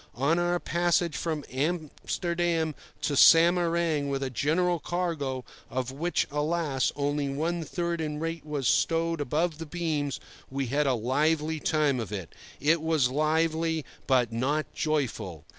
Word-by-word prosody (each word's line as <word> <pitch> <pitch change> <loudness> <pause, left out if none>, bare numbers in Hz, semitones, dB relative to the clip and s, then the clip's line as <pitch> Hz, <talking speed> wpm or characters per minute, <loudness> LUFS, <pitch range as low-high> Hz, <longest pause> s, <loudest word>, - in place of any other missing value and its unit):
On 145 +7 +2
our 175 0 +1
passage 175 -1 +1
from 155 -3 -2
Amsterdam 165 +2 -1 0.3
to 145 - 0
Samarang 165 -2 +5
with 135 0 -1
a 130 - -3
general 170 +7 +1
cargo, 150 -7 -2 0.2
of 130 0 -2
which, 165 +6 0
alas! 150 -2 0
only 145 0 -1
one 165 +5 -1
third 170 0 -2
in 150 -1 -3
weight 165 0 -3
was 145 -4 -2
stowed 165 +3 +2
"above 155 +3 0
the 165 - -6
beams," 155 -4 -2 0.3
we 135 0 -2
had 140 +4 +1
a 130 - +3
lively 150 +6 +1
time 150 -4 +1
of 110 -3 -5
it. 95 -5 -5 0.3
It 155 +3 +3
was 155 -6 +2
lively, 160 +2 +1 0.2
but 125 -4 +3
not 140 +7 -1
joyful. 130 - -2
155 Hz, 140 wpm, -28 LUFS, 140-165 Hz, 0.3 s, Samarang